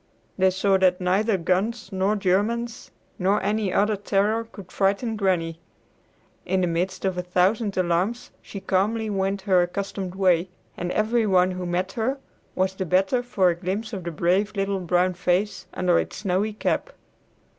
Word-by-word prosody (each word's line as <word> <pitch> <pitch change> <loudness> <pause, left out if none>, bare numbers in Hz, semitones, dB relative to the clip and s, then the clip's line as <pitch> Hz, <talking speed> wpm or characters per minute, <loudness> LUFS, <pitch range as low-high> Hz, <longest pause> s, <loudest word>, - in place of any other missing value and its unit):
They 190 0 +4
saw 190 +1 +2
that 185 -1 +3
neither 195 +3 +1
guns 195 +5 -1
nor 195 +2 +1
Germans 215 +5 -1 0.3
nor 195 +3 +2
any 210 -1 0
other 210 +3 +2
terror 205 +3 0
could 200 -5 -13
frighten 200 +4 0
Granny. 175 -5 0 0.8
In 190 +1 0
the - - +2
midst 180 +3 -2
of 185 -2 0
a - - 0
thousand 190 +4 +1
alarms 185 +7 0
she 200 - -8
calmly 210 +4 0
went 195 0 -1
her 190 -3 +4
accustomed 190 +1 -3
way, 185 -2 +2 0.3
and 175 0 -3
every 220 +1 +1
one 185 -1 +3
who 180 -1 -4
met 180 +2 -1
her 240 +6 -1 0.4
was 190 0 +1
the 190 - -3
better 190 +8 +2
for 195 -7 +2
a - - -3
glimpse 200 +6 -4
of 190 -3 -4
the 170 - -3
brave 185 +6 0
little 195 0 -1
brown 180 +1 +1
face 180 +3 -1
under 180 -2 +2
its - - -4
snowy 200 +2 -1
cap. 220 - -1
190 Hz, 165 wpm, -24 LUFS, 180-210 Hz, 0.8 s, They